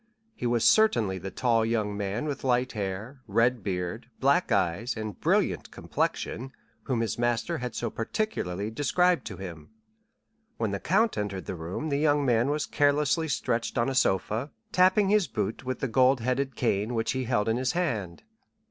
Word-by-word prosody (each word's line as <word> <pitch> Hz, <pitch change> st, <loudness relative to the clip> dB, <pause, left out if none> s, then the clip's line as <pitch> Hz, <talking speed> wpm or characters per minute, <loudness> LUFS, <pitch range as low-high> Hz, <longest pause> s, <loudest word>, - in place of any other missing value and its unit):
He 125 Hz, -, -3 dB
was 120 Hz, -1 st, +1 dB
certainly 115 Hz, -, +4 dB
the 95 Hz, -, -5 dB
tall 115 Hz, +3 st, +1 dB
young 110 Hz, -2 st, 0 dB
man 100 Hz, +5 st, -2 dB
with 145 Hz, -3 st, -4 dB
light 125 Hz, -1 st, +1 dB
hair, 105 Hz, +6 st, -5 dB
red 115 Hz, +3 st, +2 dB
beard, 90 Hz, +4 st, -3 dB
black 140 Hz, +6 st, +2 dB
eyes, 100 Hz, +5 st, 0 dB
and 110 Hz, -1 st, -5 dB
brilliant -, -, +1 dB
complexion, 130 Hz, +3 st, -3 dB, 0.3 s
whom 125 Hz, -4 st, 0 dB
his 115 Hz, -1 st, -2 dB
master 120 Hz, +7 st, 0 dB
had 125 Hz, -2 st, -5 dB
so 115 Hz, -2 st, -2 dB
particularly 110 Hz, -, -2 dB
described 175 Hz, +8 st, +2 dB
to -, -, -7 dB
him. 85 Hz, -6 st, -8 dB, 0.9 s
When 110 Hz, -3 st, -1 dB
the 100 Hz, -, -2 dB
count 200 Hz, -, +2 dB
entered 100 Hz, -2 st, -3 dB
the -, -, -4 dB
room 90 Hz, -, -4 dB
the 140 Hz, -1 st, 0 dB
young 145 Hz, -1 st, +3 dB
man 120 Hz, +1 st, +3 dB
was 150 Hz, +1 st, 0 dB
carelessly 145 Hz, +3 st, +2 dB
stretched 120 Hz, -5 st, -1 dB
on 120 Hz, +2 st, +2 dB
a -, -, -2 dB
sofa, 110 Hz, -, +1 dB, 0.2 s
tapping 185 Hz, +2 st, +4 dB
his 210 Hz, -3 st, +3 dB
boot 115 Hz, -, -3 dB
with 130 Hz, -1 st, -3 dB
the 135 Hz, -, 0 dB
gold 130 Hz, +2 st, +4 dB
headed 130 Hz, +2 st, -1 dB
cane 110 Hz, 0 st, 0 dB
which 115 Hz, 0 st, 0 dB
he 130 Hz, -1 st, -2 dB
held 110 Hz, -3 st, +1 dB
in 115 Hz, +1 st, +1 dB
his 130 Hz, +4 st, 0 dB
hand. 110 Hz, -, -2 dB
120 Hz, 175 wpm, -28 LUFS, 105-140 Hz, 0.9 s, certainly